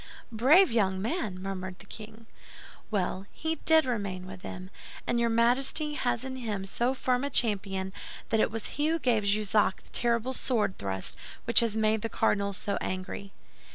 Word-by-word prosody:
"Brave 280 Hz, -, +5 dB
young 190 Hz, -5 st, +2 dB
man!" 215 Hz, -, -2 dB
murmured 185 Hz, -1 st, -5 dB
the -, -, -12 dB
king. 220 Hz, +2 st, -10 dB, 0.6 s
"Well, 190 Hz, -1 st, -1 dB
he 320 Hz, 0 st, -2 dB
did 320 Hz, -2 st, +6 dB
remain 200 Hz, -7 st, -3 dB
with 185 Hz, 0 st, -9 dB
them; 185 Hz, 0 st, -8 dB, 0.3 s
and 240 Hz, -, +1 dB
your 235 Hz, 0 st, +2 dB
Majesty 255 Hz, +6 st, +2 dB
has 120 Hz, -, -1 dB
in 260 Hz, 0 st, -5 dB
him 210 Hz, -6 st, -3 dB
so 240 Hz, +6 st, 0 dB
firm 250 Hz, 0 st, 0 dB
a 280 Hz, -, -1 dB
champion 195 Hz, -6 st, 0 dB, 0.4 s
that 225 Hz, -, +2 dB
it -, -, +3 dB
was 225 Hz, 0 st, -5 dB
he 295 Hz, +2 st, -1 dB
who 325 Hz, +1 st, +2 dB
gave 235 Hz, -8 st, +1 dB
Jussac 205 Hz, -1 st, +2 dB
the -, -, -19 dB
terrible 235 Hz, +1 st, +1 dB
sword 230 Hz, -7 st, 0 dB
thrust 95 Hz, -1 st, -2 dB, 0.3 s
which 235 Hz, -, +6 dB
has 230 Hz, -2 st, 0 dB
made 220 Hz, 0 st, +2 dB
the 225 Hz, -, -2 dB
cardinal 200 Hz, -1 st, +1 dB
so 200 Hz, 0 st, -2 dB
angry." 185 Hz, +1 st, -4 dB
220 Hz, 175 wpm, -29 LUFS, 195-245 Hz, 0.6 s, did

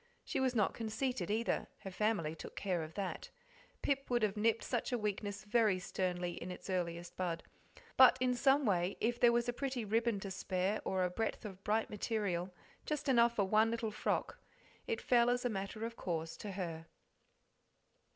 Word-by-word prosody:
She -, -, -1 dB
was 260 Hz, -1 st, +1 dB
not 210 Hz, -4 st, +2 dB
conceited 225 Hz, -2 st, -2 dB
either, 225 Hz, +3 st, 0 dB
her 195 Hz, -, -6 dB
family 185 Hz, -6 st, 0 dB
took 165 Hz, -, -9 dB
care 185 Hz, -4 st, -1 dB
of 155 Hz, 0 st, -7 dB
that 195 Hz, -2 st, -4 dB, 0.5 s
Pip 275 Hz, -1 st, 0 dB
would 240 Hz, -2 st, +2 dB
have 210 Hz, -1 st, +1 dB
nipped 225 Hz, +1 st, +2 dB
such 245 Hz, +1 st, -1 dB
a 245 Hz, -, +1 dB
weakness 205 Hz, -2 st, -3 dB
very 210 Hz, -2 st, +3 dB
sternly 180 Hz, -1 st, -2 dB
in 175 Hz, -, -5 dB
its 180 Hz, +1 st, -6 dB
earliest 175 Hz, -1 st, -2 dB
bud; 170 Hz, -3 st, -2 dB, 0.5 s
but 260 Hz, -1 st, +8 dB
in 250 Hz, 0 st, +2 dB
some 270 Hz, +3 st, +4 dB
way 180 Hz, -3 st, +1 dB
if 240 Hz, +2 st, 0 dB
there 240 Hz, -, +6 dB
was 235 Hz, 0 st, +1 dB
a 245 Hz, -, 0 dB
pretty 260 Hz, -3 st, -2 dB
ribbon 225 Hz, 0 st, +1 dB
to 195 Hz, -, -5 dB
spare, 190 Hz, +2 st, -1 dB
or 190 Hz, -1 st, +1 dB
a 180 Hz, -, 0 dB
breadth 225 Hz, +3 st, -2 dB
of 195 Hz, -2 st, -8 dB
bright 220 Hz, +2 st, +1 dB
material; 200 Hz, -4 st, -1 dB, 0.3 s
just 300 Hz, -1 st, -3 dB
enough 235 Hz, -3 st, +5 dB
for 200 Hz, -, +2 dB
one 215 Hz, +3 st, +4 dB
little 230 Hz, -1 st, -2 dB
frock, -, -, -1 dB, 0.5 s
it 460 Hz, -2 st, -1 dB
fell 240 Hz, -1 st, +4 dB
as 245 Hz, 0 st, +1 dB
a -, -, +3 dB
matter 200 Hz, +1 st, -3 dB
of 230 Hz, 0 st, -5 dB
course 165 Hz, -5 st, -3 dB
to 205 Hz, -2 st, -6 dB
her. 165 Hz, -4 st, -4 dB
210 Hz, 190 wpm, -35 LUFS, 185-235 Hz, 0.5 s, but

